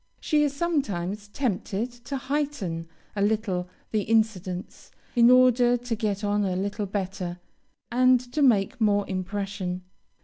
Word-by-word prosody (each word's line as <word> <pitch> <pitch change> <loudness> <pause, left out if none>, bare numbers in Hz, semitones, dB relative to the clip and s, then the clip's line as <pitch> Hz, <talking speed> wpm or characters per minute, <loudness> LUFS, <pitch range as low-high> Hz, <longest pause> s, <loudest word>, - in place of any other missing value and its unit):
She 300 -2 +2
is 290 - +1
sometimes 210 - -1
tempted 225 0 -2
to 245 +3 -6
heighten 260 - -2 0.3
a 200 - -1
little 200 -4 0 0.2
the 215 - +1
incidents, 200 -4 -1 0.3
in 235 0 +7
order 250 -1 +5
to 245 -1 -3
get 210 -2 -2
on 205 0 +1
a 185 -2 0
little 205 +2 -2
better, 185 -2 -4 0.5
and 255 +1 +5
to 305 - 0
make 240 -1 +3
more 205 -2 +3
impression. 185 -1 -3
210 Hz, 135 wpm, -26 LUFS, 190-245 Hz, 0.5 s, in